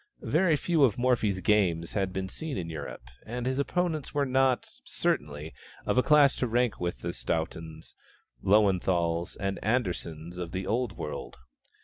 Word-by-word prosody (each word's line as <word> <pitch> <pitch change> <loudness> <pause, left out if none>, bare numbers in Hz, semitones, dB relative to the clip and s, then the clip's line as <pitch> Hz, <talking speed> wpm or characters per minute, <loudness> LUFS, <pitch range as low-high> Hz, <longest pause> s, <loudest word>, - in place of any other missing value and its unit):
Very 165 +1 +3
few 160 0 +2
of 120 -7 +4
Morphy's 115 -6 +1
games 85 -5 +2
had 95 -2 -1
been 95 0 -3
seen 155 +7 -5
in 85 -3 -4
Europe, 70 -5 -7 0.2
and 120 +2 -5
his 130 +1 0
opponents 160 -1 -1
were 145 -1 +2
not, 130 -1 +2 0.2
certainly, 75 +1 -2 0.3
of - - +1
a 125 - +5
class 145 -1 +5
to 125 - 0
rank 120 -1 +1
with 85 -8 -3
the - - -3
Stauntons, 80 0 -4 0.5
Löwenthals, 90 -4 +2
and 100 0 -2
Anderssens 90 -7 -2
of 85 -2 -5
the 95 0 -2
Old 115 +1 -1
World. 75 - -6
100 Hz, 155 wpm, -29 LUFS, 85-130 Hz, 0.5 s, a